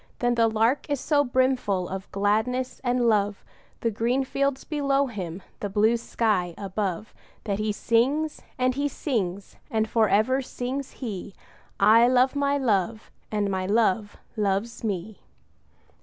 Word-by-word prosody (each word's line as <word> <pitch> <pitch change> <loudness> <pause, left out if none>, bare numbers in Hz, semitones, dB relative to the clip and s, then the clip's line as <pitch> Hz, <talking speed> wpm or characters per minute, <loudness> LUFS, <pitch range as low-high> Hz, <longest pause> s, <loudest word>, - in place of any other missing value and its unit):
But 245 0 +1
the 230 -1 +4
Lark 225 +7 +1
is 285 -2 0
so 290 +1 +2
brimful 250 -8 +1
of 190 +1 -6
gladness 220 +6 0
and 245 -1 +1
love, 205 -2 +1 0.4
The 230 - +1
green 235 +5 0
fields 275 0 -1
below 280 -2 +1
him, 190 -7 -6 0.2
the 205 - -3
blue 215 +3 +3
sky 210 -7 0
above, 200 0 -3 0.3
That 200 -2 -2
he 215 0 0
sings, 265 +9 +1 0.2
and 255 0 +2
he 285 +2 0
sings; 200 - -3
and 220 -1 0
for 220 -2 +2
ever 255 +6 +3
sings 260 +1 -5
he 200 -2 -6 0.4
'I 225 +4 +6
love 255 +2 +3
my 285 0 +1
Love, 215 -4 0 0.2
and 205 -2 0
my 185 -1 -1
Love 210 -1 +1 0.2
loves 210 +2 -1
me!' 205 -1 -3
225 Hz, 145 wpm, -26 LUFS, 205-255 Hz, 0.4 s, I